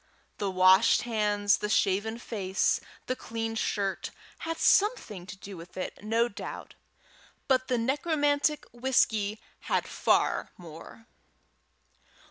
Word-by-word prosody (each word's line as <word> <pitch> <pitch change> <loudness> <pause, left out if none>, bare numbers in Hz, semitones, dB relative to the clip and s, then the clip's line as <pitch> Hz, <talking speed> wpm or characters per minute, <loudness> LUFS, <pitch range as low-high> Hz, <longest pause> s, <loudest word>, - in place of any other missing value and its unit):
The 200 - -1
washed 185 +3 +5
hands, 210 -3 +1
the 210 - -3
shaven 210 +3 +1
face, 195 -5 0 0.3
the 255 - -2
clean 225 -2 -4
shirt, 200 -3 -2 0.3
had 330 0 -4
something 235 - +2
to 190 - -8
do 195 +1 -9
with 170 +1 -12
it, 185 - -5
no 225 +2 +2
doubt, 200 - -8 0.7
but 255 -1 +2
the 250 - +1
necromantic 290 +3 +1
whisky 225 -4 +1 0.3
had - - 0
far - - +1
more. 170 +6 -12
220 Hz, 115 wpm, -28 LUFS, 195-255 Hz, 0.7 s, washed